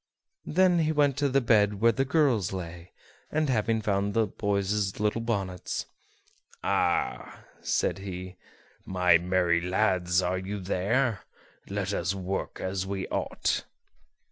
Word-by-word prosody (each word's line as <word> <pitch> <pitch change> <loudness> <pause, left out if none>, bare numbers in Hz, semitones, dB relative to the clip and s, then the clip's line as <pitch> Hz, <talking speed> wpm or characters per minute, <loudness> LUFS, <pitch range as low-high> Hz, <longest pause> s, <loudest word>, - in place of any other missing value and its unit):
Then 180 +1 +4
he 155 -1 +2
went 145 -3 +3
to 145 -1 +1
the 135 +1 +3
bed 105 -4 +3
where 115 +2 +5
the 135 +4 0
girls 130 - +2
lay; 85 -1 -7 0.4
and, 155 -1 +1
having 110 -1 +1
found 100 0 0
the 115 -1 +3
boys' 100 -1 -1
little 105 +2 0
bonnets, 100 -6 -3 0.8
"Ah!" - - 0 0.2
said - - 0
he, 95 -1 -7 0.5
"my 90 -2 +3
merry 90 -1 +2
lads, 90 -1 +1
are 90 +1 0
you 100 +2 -5
there? 100 +5 0 0.5
Let 100 0 -2
us 90 +1 -1
work 95 0 -4
as 95 0 -2
we 95 -1 -3
ought." - - -1
100 Hz, 135 wpm, -28 LUFS, 95-115 Hz, 0.8 s, where